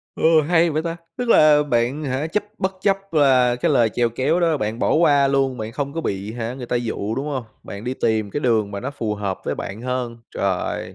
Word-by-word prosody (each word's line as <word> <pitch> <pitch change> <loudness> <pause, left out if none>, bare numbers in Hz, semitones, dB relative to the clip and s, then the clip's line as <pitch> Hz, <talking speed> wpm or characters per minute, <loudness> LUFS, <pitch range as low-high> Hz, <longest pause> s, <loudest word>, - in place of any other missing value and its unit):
Ơ, 160 -1 +4
hay 170 -1 +4
vậy 155 +1 -1
ta, 170 0 -3 0.2
tức 245 -1 -2
là 150 -6 +6
bạn, 130 +2 0
hả, 135 +3 -1
chấp 205 +6 -1
bất 190 0 -1
chấp 195 -1 +2
và 130 -5 +4
cái - - 0
lời 115 -2 +4
chèo 120 +2 0
kéo 135 +9 0
đó 165 -3 +2
bạn 110 -2 -3
bỏ - - +1
qua 145 -4 +4
luôn, 135 -2 +1
bạn 110 0 -5
không 140 +2 -3
có 165 - -3
bị, 100 -5 -3
hả, 120 +1 -4
người 125 -2 -7
ta 120 - 0
dụ, 110 -2 -3
đúng 140 +4 -3
hông? 135 -4 -3 0.2
Bạn 100 +3 -8
đi 125 - -2
tìm 110 -4 0
cái 145 - -3
đường 110 -5 +1
mà 100 - -5
nó 130 +3 -4
phù 110 -7 -3
hợp 100 -2 -3
với - - -1
bạn 100 +3 -6
hơn, 125 -2 -3 0.2
rồi. 95 -2 -2
130 Hz, 240 wpm, -21 LUFS, 115-150 Hz, 0.2 s, là